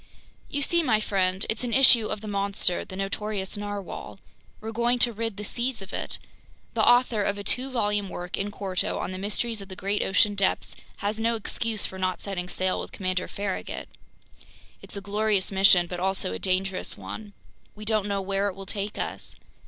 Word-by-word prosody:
"You 285 0 0
see, 340 +4 +3
my 220 -9 +3
friend, 190 -2 +1
it's 220 +2 -1
an 240 -2 -2
issue 245 -4 +7
of 210 - -4
the 215 - -7
monster, 200 -3 +1
the 185 - -9
notorious 195 0 -2
narwhale. 205 -2 -5 0.4
We're 220 +1 -5
going 235 +2 +2
to 240 -1 +5
rid 225 -1 -3
the 210 - -5
seas 240 +4 -1
of 195 0 -9
it! - - -2 0.6
The - - +1
author 245 -3 +5
of 200 0 0
a 205 - -5
two 255 +5 0
volume 205 -5 0
work, 175 0 -4
in 200 - -2
quarto, 195 -3 -1
on - - -3
The 185 - -5
Mysteries 210 +2 -1
of 195 - -10
the 190 - -7
Great 200 +2 -1
Ocean 205 +2 +3
Depths 195 -1 0 0.3
has 210 +2 0
no 230 +1 +2
excuse 220 0 -1
for 190 - -6
not 185 0 0
setting 180 -3 -4
sail 185 +1 0
with - - -5
Commander 185 -1 -1
Farragut. 200 -1 -4 0.9
It's - - -2
a - - -4
glorious 205 -1 +1
mission 190 -2 +6
but 175 0 -5
also 190 - 0
a 95 - -4
dangerous 185 0 +2
one! 210 -2 -8 0.4
We 215 0 -9
don't 215 -2 +1
know 200 -1 0
where 195 +1 0
it 195 - -3
will 195 0 -8
take 200 +1 -3
us! - - -4
200 Hz, 200 wpm, -27 LUFS, 190-220 Hz, 0.9 s, issue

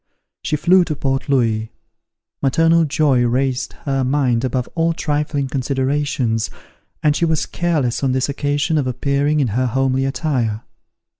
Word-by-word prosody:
She 150 - -1
flew 180 +4 +4
to 155 - -3
Port 135 +1 -2
Louis; 115 -5 +1 0.7
maternal 165 +4 +3
joy 145 -4 +2
raised 130 +2 0
her 135 -2 0
mind 130 -3 +1
above 125 -1 -1
all 165 0 +1
trifling 145 -2 -1
considerations, 130 -3 -1 0.5
and 150 -1 +3
she - - -1
was 160 -2 +1
careless 155 -9 -1
on 135 - +2
this 130 0 0
occasion 145 +2 0
of 135 - -1
appearing 140 +4 0
in 130 - +1
her 125 +5 0
homely 135 +2 +1
attire. 130 -6 -1
135 Hz, 145 wpm, -19 LUFS, 130-150 Hz, 0.7 s, flew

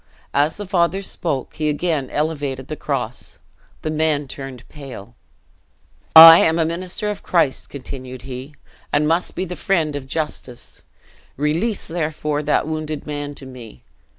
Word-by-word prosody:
As 145 +3 +2
the 205 - -5
father 185 0 +1
spoke, 150 -8 -3
he 155 -1 0
again 150 -3 -1
elevated 145 -4 -2
the 155 - -3
cross: 125 -6 -4 0.5
the 155 - -2
men 155 -2 0
turned 135 -2 -8
pale. 130 -7 -10 1.0
"I 165 +1 +12
am 160 +1 +3
a 165 - +2
minister 185 +5 -2
of 205 - -7
Christ," 165 -7 +1
continued 130 -2 -8
he, 135 +2 -8 0.4
"and 150 +1 +2
must 165 +3 +1
be 185 - -2
the 180 0 -6
friend 165 -7 0
of 135 -2 -6
justice. 135 -4 -4 0.6
Release, 165 - 0
therefore, 150 -3 -2
that 150 - +1
wounded 155 -1 -4
man 145 -1 -5
to 135 - -10
me. 120 - -12
150 Hz, 150 wpm, -21 LUFS, 135-165 Hz, 1.0 s, I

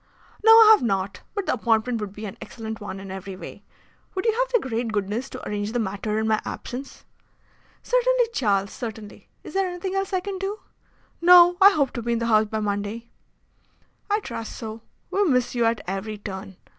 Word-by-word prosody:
"No, 445 - +7
I 450 -1 +9
have 435 - +6
not. 195 -5 -1
But 405 -2 -2
the - - +1
appointment 230 0 +1
would 205 -2 -4
be 210 +2 -8
an 195 - -7
excellent 220 -1 -7
one 195 -2 -6
in 195 -1 -8
every 190 0 -7
way. 185 - -10 0.5
Would 375 - -2
you 450 - +4
have - - 0
the 475 - +1
great 230 -1 -2
goodness 210 +5 -2
to - - -8
arrange 205 +1 -3
the 245 - 0
matter 210 0 -2
in 220 0 0
my 215 -1 +2
absence?" 260 +3 -7 0.8
"Certainly, - - +2
Charles, 200 - +1
certainly. 220 -4 -8
Is - - -10
there 385 0 +1
anything 360 +1 -4
else 390 0 -1
that 380 - 0
I - - -2
can 390 0 -5
do?" 395 +3 -4 0.6
"No. 355 0 +8
I 395 - +10
hope 285 -9 +1
to 240 - -5
be 235 +1 -1
in - - +1
the 230 - -2
House 220 -1 +4
by 220 +1 -3
Monday." 210 +3 -3 1.0
"I 415 +1 +1
trust 230 - -6
so. 220 0 -7 0.3
We 405 - +2
miss 250 -7 +1
you 240 -2 +1
at 230 -2 +1
every 195 +3 -4
turn. 195 -1 -7
230 Hz, 205 wpm, -24 LUFS, -, 1.0 s, I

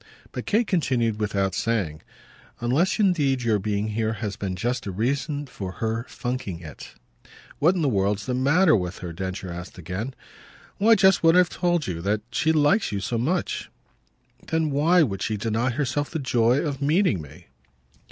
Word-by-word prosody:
But - - -6
Kate 225 +3 +2
continued 125 - 0
without 100 -3 0
saying. 95 -11 -1 0.6
"Unless 135 +10 +1
indeed 145 - +2
your 110 -3 +2
being 105 +1 -1
here 110 +1 -1
has 105 -3 -4
been 95 -2 -4
just 120 +5 -2
a - - -2
reason 140 - -1
for 95 -8 -7
her 115 +2 -3
funking 120 -8 -4
it." 75 -4 -11 0.6
"What 170 +6 +4
in 175 - 0
the - - +2
world's 100 -3 0
the 130 - -2
matter 150 +7 +4
with 90 -2 -2
her?" 85 - -5
Densher 95 +1 -5
asked 90 +2 -8
again. 95 +9 -5 0.6
"Why 225 +3 +6
just 195 -3 +4
what 165 0 +5
I've 180 -1 +5
told 175 -4 0
you 85 -6 -4
that 105 +3 0
she 160 +5 +2
likes 155 +7 +3
you 100 - -2
so 115 +4 -2
much." 165 +9 -1 0.8
"Then 160 -2 0
why 165 +6 +4
should 95 -3 -5
she 110 - -1
deny 115 +4 0
herself 145 +3 -1
the 160 - -3
joy 120 -3 +2
of 145 -4 -3
meeting 150 - +2
me?" 70 -2 -13
120 Hz, 175 wpm, -24 LUFS, 100-150 Hz, 0.8 s, Why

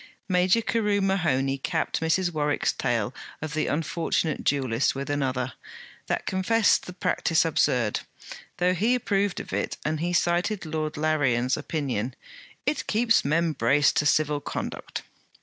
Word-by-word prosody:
Major 185 +4 +3
Carew 210 -3 +1
Mahoney 160 -9 +1
capped - - -1
Mrs. 175 +2 +1
Warwick's 150 -2 0
tale - - -1 0.3
of 155 0 -5
the 155 - 0
unfortunate 160 0 -1
duellist 130 -3 +1
with 140 +1 -4
another, 130 -3 -1 0.5
that - - -1
confessed 205 +4 +2
the 180 - -7
practice 170 -2 +1
absurd, 125 -8 +1 0.6
though 180 +1 +2
he 220 +8 +2
approved 205 -5 0
of - - -8
it; - - -2
and 155 0 0
he 175 +2 -1
cited 175 +3 +1
Lord 155 -1 -3
Larrian's 135 -5 +1
opinion: 135 -6 -3 0.5
'It 290 0 -1
keeps 225 +1 +3
men 165 +3 +1
braced 140 +4 +3
to 150 - +3
civil 150 -1 +2
conduct.' - - -5
155 Hz, 140 wpm, -26 LUFS, 140-185 Hz, 0.6 s, Major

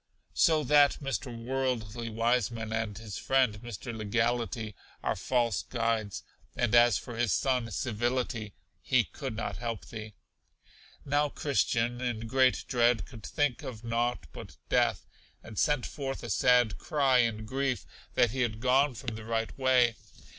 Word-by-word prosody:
So 160 -4 +4
that 145 +1 +5
Mr. 135 -1 -3
Worldly 120 -2 -2
Wiseman 115 -1 0
and 110 -3 -2
his 110 -3 -7
friend 125 -6 +2
Mr. 120 0 -6
Legality 115 +1 -1 0.3
are - - 0
false 120 -5 0
guides; 115 -4 -2 0.3
and 120 -2 0
as 120 -3 +6
for 120 - -7
his 115 -3 +1
son 125 -3 +1
Civility, 120 -2 -2 0.3
he 130 -2 +3
could 110 - -6
not 110 -5 -3
help 115 -1 -4
thee. 110 -2 -8 0.9
Now 145 +1 +2
Christian, 120 -4 0
in 120 -3 -2
great 130 +2 +2
dread, 120 -2 +2
could 115 -5 -12
think 145 -5 0
of 115 -3 -7
nought 120 -4 -1
but - - -10
death, - - +2 0.4
and 110 - -6
sent 145 -4 +2
forth 135 -2 -5
a 120 - -4
sad 120 +2 +3
cry 135 -4 +2
in 110 -2 +1
grief 130 +1 -1 0.3
that 120 - +4
he 130 +1 -2
had 110 -3 -1
gone 130 +2 +3
from 115 0 -5
the 110 - -8
right 115 0 -2
way. 130 -3 +4
120 Hz, 150 wpm, -30 LUFS, 110-130 Hz, 0.9 s, as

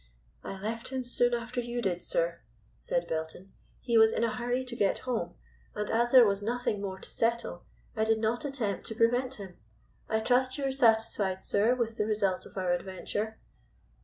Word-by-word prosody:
"I 195 - -6
left 225 +3 -4
him 260 -1 -3
soon 245 0 +2
after 240 +1 -3
you 240 0 -4
did, 185 -6 -1
sir," - - 0 0.4
said - - -1
Belton. 160 +4 -5 0.3
"He 235 -2 +3
was 220 0 +7
in 230 - 0
a 230 -2 +1
hurry 245 +3 -1
to 250 -2 -7
get 200 -4 +2
home, 250 -3 -2 0.4
and 210 0 -2
as 235 +1 +2
there 255 -3 +9
was 200 -1 +1
nothing 225 -1 -1
more 190 -2 -4
to - - -8
settle 230 -6 -1 0.3
I 220 - +1
did 220 0 +3
not 225 +5 0
attempt 265 -8 -2
to 225 - -5
prevent 245 +3 +2
him. 190 -4 -10 0.5
I 220 0 +1
trust 255 +3 +2
you 285 - -3
are 270 - +1
satisfied, 225 -6 +2
sir, 215 +5 +3
with 230 -2 -2
the 210 - 0
result 200 -4 0
of - - -15
our 185 -2 +1
adventure." 195 +4 -3
225 Hz, 190 wpm, -30 LUFS, 205-245 Hz, 0.5 s, there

